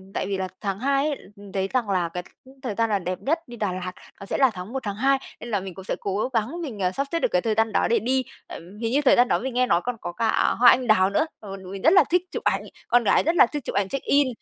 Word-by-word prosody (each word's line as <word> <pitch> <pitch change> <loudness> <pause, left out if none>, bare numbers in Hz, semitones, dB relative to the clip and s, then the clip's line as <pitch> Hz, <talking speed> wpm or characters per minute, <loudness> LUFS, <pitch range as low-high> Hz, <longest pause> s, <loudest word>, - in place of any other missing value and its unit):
tại - - -1
vì 195 0 -2
là 185 0 -2
tháng 195 -2 -2
2 275 +2 +1
ấy, 290 - -2 0.2
ừm, 200 -1 -13
thấy 195 -1 -1
rằng 235 -5 +1
là 180 -3 +1
cái, 180 +2 -5 0.2
ừm, 265 +1 -16
thời 230 -6 -3
gian 230 0 0
là 200 - +2
đẹp 180 0 -4
nhất 315 +5 +1
đi 240 -1 -10
Đà 210 -4 -1
Lạt, 185 0 -5 0.3
nó 195 - -8
sẽ - - -2
là 265 -2 +5
tháng 180 +6 -7
1 265 - -3
tháng 205 -1 -4
2, 270 +3 +3 0.2
nên 240 - -7
là 205 -3 0
mình 190 -2 -7
cũng 190 - -10
sẽ - - -2
cố 200 +5 -1
gắng 250 +10 -1
mình, 245 -10 -6
ờ, 180 0 +1
sắp 275 +5 -2
xếp 335 - +1
được - - +2
cái 180 - +1
thời 220 -2 0
gian 225 -1 +1
đó - - +2
để 230 - +3
đi. 260 +2 0 0.2
Ừm, 185 +5 -10
hình 230 +1 -2
như 285 - +3
thời - - +6
gian 245 +1 +4
đó - - +2
mình 260 0 -4
nghe 250 0 +3
nói 175 - +3
còn 245 -1 -2
có 175 - -5
cả 225 +4 +1
hoa 240 0 +8
anh 250 -1 +2
đào 190 -3 +4
nữa, 255 - +1
ờ, 195 -2 -7
tụi 190 0 -10
mình 195 - -7
rất 320 +6 +5
là 380 - +7
thích 360 0 +3
chụp - - -5
ảnh, - - +1 0.3
con 240 -1 +4
gái - - +4
rất 335 +2 0
là 250 - +7
thích 290 0 -5
chụp - - -5
ảnh 200 -1 +1
check 275 - -4
in, 280 -1 +3
225 Hz, 325 wpm, -24 LUFS, 195-260 Hz, 0.3 s, hoa